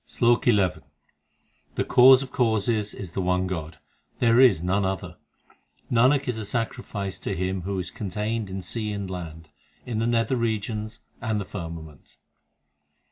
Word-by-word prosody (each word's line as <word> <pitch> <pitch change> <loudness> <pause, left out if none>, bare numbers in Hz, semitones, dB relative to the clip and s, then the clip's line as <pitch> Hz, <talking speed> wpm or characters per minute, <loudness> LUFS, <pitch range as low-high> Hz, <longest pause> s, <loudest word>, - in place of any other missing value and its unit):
SLOK 120 -1 +2
XI 105 -6 +5 1.1
The - - +1
Cause 130 +1 +7
of 130 - -10
causes 110 -3 0
is 95 -4 -7
the 95 - -2
One 90 0 +1
God, 80 -3 -5 0.4
there 115 0 +4
is 110 -11 +6
none 95 +3 +1
other. 95 -1 -3 0.7
Nanak 130 +4 +4
is 120 -3 -2
a - - -4
sacrifice 100 -3 -3
to 100 - -3
Him 95 +1 -2
who 95 +2 -3
is 90 -2 -3
contained 105 +2 -3
in 95 0 -5
sea 105 +3 -3
and 100 -1 -4
land, 80 -3 -7 0.4
in 115 -3 -3
the 115 - +1
nether 120 +2 +1
regions 110 -1 -2 0.2
and 110 -2 -1
the 100 - -4
firmament. 80 -6 -9
105 Hz, 155 wpm, -25 LUFS, 95-115 Hz, 1.1 s, Cause